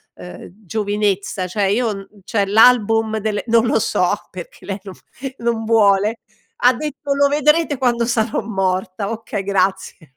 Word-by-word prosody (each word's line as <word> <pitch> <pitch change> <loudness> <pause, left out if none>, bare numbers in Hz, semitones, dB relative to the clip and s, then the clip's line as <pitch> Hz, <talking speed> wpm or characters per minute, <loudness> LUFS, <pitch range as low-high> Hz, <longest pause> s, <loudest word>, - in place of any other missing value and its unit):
ehm, 90 -1 -10 0.2
giovinezza 205 -1 -1
cioè, 195 +1 0
io 230 +1 +1
n 195 -1 -9 0.2
cioè 200 -2 0
l'album 225 0 +4
delle 210 -1 -2
non 230 0 +3
lo - - +2
so, 180 -4 +1 0.2
perché 180 -2 -10
lei 195 0 -4
non 190 -3 -9 0.4
non 235 -1 -2
vuole, 215 0 +3 0.4
ha 250 +1 +4
detto: 285 +1 -4
"Lo 280 0 +3
vedrete 300 +1 +2
quando 240 -2 +1
sarò 230 -2 0
morta". 195 -1 -2
Okay, 225 -3 -5
grazie, 190 -6 -2
215 Hz, 150 wpm, -19 LUFS, 195-235 Hz, 0.4 s, l'album